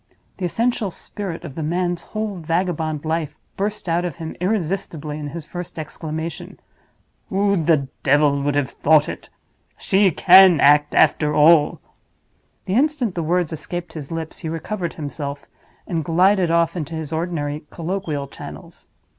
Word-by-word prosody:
The 185 - -3
essential 230 +3 0
spirit 185 -1 -6
of 145 - -7
the 160 - -5
man's 175 +2 -1
whole 215 -2 -4
vagabond 165 -2 -1
life 155 -2 -2 0.2
burst 205 0 -3
out 170 +1 +1
of 175 -5 -3
him 160 -1 -7
irresistibly 170 -6 -2
in 150 - -5
his 155 +1 -7
first 175 0 -7
exclamation. 160 +1 -6 0.7
"Who 200 +1 +2
the 155 -5 +2
devil 140 0 +3
would 145 0 0
have 140 -2 0
thought 150 0 +3
it? - - -7 0.5
She 195 0 +3
can 185 0 +7
act, 145 +1 +5
after 150 -1 +3
all!" 150 0 +5 0.9
The 190 - -2
instant 265 - +1
the 170 - -2
words 170 0 0
escaped 170 +1 -5
his 150 -2 -8
lips 165 -1 -5
he 160 - -5
recovered 170 +3 -4
himself, 145 -1 -6 0.4
and 165 -4 -2
glided 180 +3 +3
off 170 0 +2
into 165 -1 -4
his 160 -1 -5
ordinary 155 -3 -3
colloquial 165 -4 -3
channels. - - -11
165 Hz, 150 wpm, -21 LUFS, 150-180 Hz, 0.9 s, can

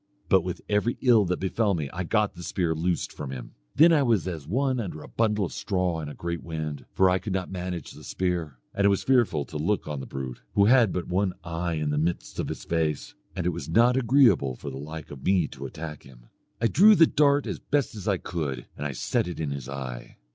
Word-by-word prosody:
But 95 -2 +5
with 90 +1 -5
every 105 +3 +1
ill 115 -5 +5
that 90 0 -1
befell 100 +1 +1
me 75 -4 -2
I 90 - -3
got 105 +3 +1
the 90 - -11
spear 85 0 -1
loosed 85 +2 -1
from 70 - -6
him. 65 -2 -7 0.2
Then 165 +3 +7
I 150 - +4
was 115 -8 +2
as 80 -6 -5
one 130 - 0
under 90 -8 -5
a - - -10
bundle 105 -3 +1
of - - -7
straw 90 -4 -1
in 75 - -5
a - - -8
great 85 0 -4
wind, 80 -3 -5
for 95 - +4
I 90 0 +3
could 100 -1 -4
not 95 -1 -2
manage 90 -3 -5
the - - -13
spear. 85 -7 -2 0.2
And 100 - 0
it - - +6
was 100 - +1
fearful 120 - +2
to 75 - -6
look 100 +7 0
on 75 -2 -3
the 65 - -7
brute, 65 -2 -6
who 100 - +5
had 115 -3 +5
but 90 - -3
one 95 +1 0
eye 85 0 -2
in 75 -1 -1
the 75 - 0
midst 85 +2 -2
of - - -1
his - - -5
face; 80 -3 -1 0.2
and 90 - -3
it - - +3
was 80 -3 -6
not 120 +7 +4
agreeable 115 - +4
for 70 - -7
the 65 - -7
like 80 +2 -8
of 70 -2 -10
me 90 -5 +3
to 70 0 -7
attack 75 0 -7
him. - - -17 0.3
I 115 - 0
drew 210 - +7
the 165 - +7
dart 145 -1 +3
as - - -4
best 140 -6 -1
I 100 -3 +2
could, 70 -9 -4
and 75 - -3
I 70 - -5
set 85 - -1
it 90 - -6
in 75 -3 -2
his 70 -2 -5
eye. 65 -3 -7
90 Hz, 245 wpm, -26 LUFS, 75-105 Hz, 0.3 s, Then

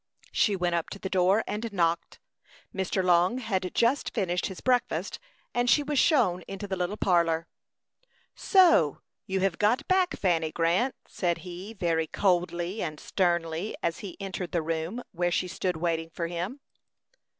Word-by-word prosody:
She 205 - +2
went 175 -2 0
up 170 -1 -1
to - - -7
the 190 -1 -6
door 190 +3 +3
and 220 +2 -4
knocked. 170 -3 0 0.5
Mr. 190 0 -1
Long 180 +5 +3
had 195 -7 -2
just 245 +4 +1
finished 180 -5 0
his 190 - -8
breakfast, 250 -1 0 0.3
and 245 0 +1
she 290 +5 +5
was 290 -1 0
shown 230 - +3
into 195 +1 -6
the 195 - -2
little 180 +3 -2
parlor. 170 -4 +2 0.9
"So 335 - +4 0.2
you 190 0 -1
have 190 -3 0
got 215 +4 +2
back, 370 -1 +2
Fanny 165 -4 +1
Grant," 175 +12 +1
said 175 -2 -1
he, 180 +4 -7
very 165 -4 0
coldly 175 +1 0
and 155 -1 -4
sternly, 170 +1 -1
as 170 0 -1
he 195 -4 -8
entered 190 -2 -5
the 170 -2 +1
room 165 +9 -3
where 175 -1 0
she 180 +1 0
stood 180 -1 -2
waiting 165 -1 -1
for 170 0 -4
him. 175 +11 -4
185 Hz, 160 wpm, -28 LUFS, 170-210 Hz, 0.9 s, she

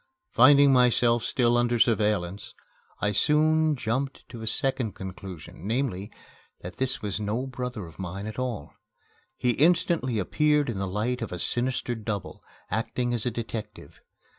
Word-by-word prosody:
Finding 140 +2 +7
myself 120 -2 +4
still 120 -1 +2
under 120 0 +2
surveillance, 105 -5 +1 0.5
I 105 - +2
soon 155 +5 +3
jumped 130 +3 -3
to 120 -3 -9
a 110 - -6
second 130 -2 0
conclusion, 95 -2 -8
namely, 110 -5 -1 0.5
that 90 0 -8
this 130 -3 -2
was 105 0 -2
no 110 +5 -2
brother 125 -5 -5
of 80 +1 -14
mine 95 +2 -5
at 110 +3 -6
all. 125 - -4 0.6
He 125 - +2
instantly 155 -4 +2
appeared 150 - +2
in 100 - -5
the 95 - -2
light 110 +6 -2
of 115 - -4
a 90 - -4
sinister 120 +5 -1
double, 105 -4 -5 0.3
acting 120 +3 -1
as 120 0 0
a - - +3
detective. 115 -1 -7
120 Hz, 150 wpm, -27 LUFS, 105-130 Hz, 0.6 s, Finding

